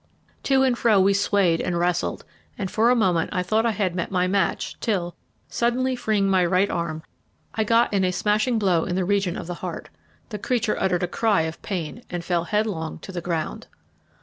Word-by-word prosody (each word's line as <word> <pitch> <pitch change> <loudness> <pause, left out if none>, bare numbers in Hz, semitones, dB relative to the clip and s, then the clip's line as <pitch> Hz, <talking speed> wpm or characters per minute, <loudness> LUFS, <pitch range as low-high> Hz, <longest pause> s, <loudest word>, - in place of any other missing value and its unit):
To 270 -1 +3
and 255 -2 +3
fro 225 -4 +3
we 195 +1 +4
swayed 195 -4 +2
and 175 - -1
wrestled, 175 0 -1 0.3
and 190 -3 -4
for 225 +2 +3
a 250 - +5
moment 185 -8 +2
I 180 -3 -1
thought 220 +5 +1
I - - +2
had 195 -4 -1
met 170 -1 -3
my 180 -1 +1
match 195 +1 0
till, 175 -6 -1 0.3
suddenly 255 +2 0
freeing 215 -5 0
my 190 -2 +3
right 180 +3 +2
arm, 160 -2 -3 0.5
I 220 - 0
got 230 +1 +2
in 195 -1 +2
a 185 - +2
smashing 215 +6 +1
blow 185 -6 +2
in 180 - -2
the 185 -1 0
region 195 -2 0
of - - -6
the 175 - -4
heart. - - -6 0.4
The 210 -3 -5
creature 235 -1 0
uttered 180 -2 +1
a - - +1
cry 210 -1 +1
of 160 0 -5
pain 180 +2 -4
and 175 -1 -5
fell 170 -1 0
headlong 205 -6 -2
to - - -10
the 175 -2 -4
ground. 165 -2 -3
190 Hz, 205 wpm, -24 LUFS, 175-215 Hz, 0.5 s, a